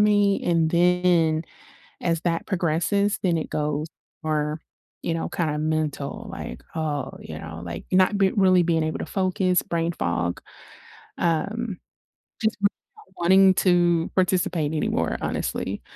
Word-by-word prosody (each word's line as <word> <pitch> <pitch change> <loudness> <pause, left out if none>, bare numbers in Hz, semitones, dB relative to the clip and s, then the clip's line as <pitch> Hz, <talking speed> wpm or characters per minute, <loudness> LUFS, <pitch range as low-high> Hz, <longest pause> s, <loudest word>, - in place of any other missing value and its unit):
me, 205 -1 +3
and 165 -2 +2
then 175 -2 +3 0.6
as 165 -2 +1
that 165 -1 -1
progresses, 190 +3 +1
then 175 -3 +2
it - - -5
goes 150 0 -1 0.4
more, 155 0 -1 0.4
you 165 - -1
know, 165 - -2
kinda 155 -3 -1
mental, 155 +6 -2
like, - - -7
oh, 150 -3 -2
you - - -8
know, 80 +1 -8
like, 85 -1 -6
not 185 +2 +4
be 195 -1 +4
really 185 -3 +4
being 165 -2 +1
able 155 - -2
to - - -3
focus, 185 -1 +1
brain 170 0 -1
fog, 85 - -2 0.8
um, 200 +5 -1 0.6
just 220 0 +1
really 200 - +4 0.3
not 185 - -19
wanting 190 +2 +6
to 175 -3 +3
participate 180 -4 +1
anymore, 155 - 0
honestly. - - -2
170 Hz, 140 wpm, -24 LUFS, 155-185 Hz, 0.8 s, wanting